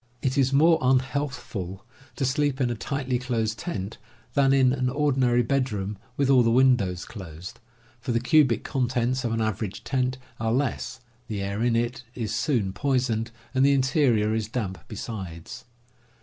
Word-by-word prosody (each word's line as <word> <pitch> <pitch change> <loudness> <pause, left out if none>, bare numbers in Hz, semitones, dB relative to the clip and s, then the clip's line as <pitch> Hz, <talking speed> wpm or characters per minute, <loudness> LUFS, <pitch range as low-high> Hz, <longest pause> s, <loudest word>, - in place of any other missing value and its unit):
It 130 0 +1
is 135 -2 +3
more 160 +4 +5
unhealthful 125 -7 -1 0.3
to 135 - -1
sleep 145 0 +1
in 125 -3 +1
a - - -2
tightly 130 +1 -2
closed 115 -3 -1
tent 100 - -5 0.3
than 135 -2 +4
in 130 -2 +4
an 130 -2 0
ordinary 130 -4 +2
bedroom 110 -6 -1 0.2
with 140 - +2
all 130 -2 +6
the 115 - +3
windows 115 -8 +3
closed, 90 -4 -9 0.4
for 125 +2 -3
the 115 - +2
cubic 125 -3 +3
contents 125 -1 0
of 120 - -1
an 115 0 0
average 110 -2 -3
tent 130 -1 0 0.2
are 110 0 0
less, 130 0 -2 0.3
the 105 -3 -3
air 100 +2 -3
in 120 -1 +2
it 120 +2 -1
is 115 -4 -3
soon 115 -11 0
poisoned, 125 -5 0 0.2
and 130 0 +3
the 140 +1 +5
interior 130 -5 +2
is 110 -2 -1
damp 110 -5 -3
besides. 95 -7 -7
125 Hz, 165 wpm, -26 LUFS, 110-135 Hz, 0.4 s, all